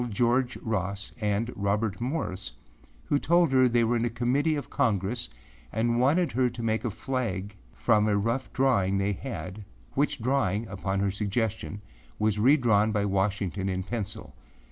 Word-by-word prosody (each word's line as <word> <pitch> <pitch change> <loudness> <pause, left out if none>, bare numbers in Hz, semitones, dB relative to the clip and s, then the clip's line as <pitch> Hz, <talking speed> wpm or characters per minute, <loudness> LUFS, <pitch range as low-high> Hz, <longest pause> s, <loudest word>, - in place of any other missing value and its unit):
George 120 +3 +1
Ross, 100 -3 -2
and 105 +3 0
Robert 100 +1 -1
Morris, 105 - -2 0.5
who 145 - +2
told 170 0 +3
her 130 -1 +5
they 120 0 +3
were 120 +1 +2
a 120 +1 0
Committee 130 +7 +1
of 145 - -4
Congress 105 - 0 0.4
and 120 +1 +1
wanted 155 +7 +3
her 125 0 +2
to 120 0 -7
make 110 0 0
a 120 - 0
flag 105 -4 -3 0.2
from 105 -3 +3
a 105 -1 +2
rough 115 +6 -1
drawing 100 -8 +2
they 100 +1 +1
had, 105 -4 -6 0.3
which 140 0 0
drawing, 115 -4 +1
upon 95 0 -2
her 100 -1 +1
suggestion, 105 +1 -2 0.4
was 105 -1 +1
redrawn 115 -4 +4
by 105 -1 +1
Washington 95 -1 0
in 95 0 -2
pencil. 105 0 -5
110 Hz, 155 wpm, -28 LUFS, 100-125 Hz, 0.5 s, her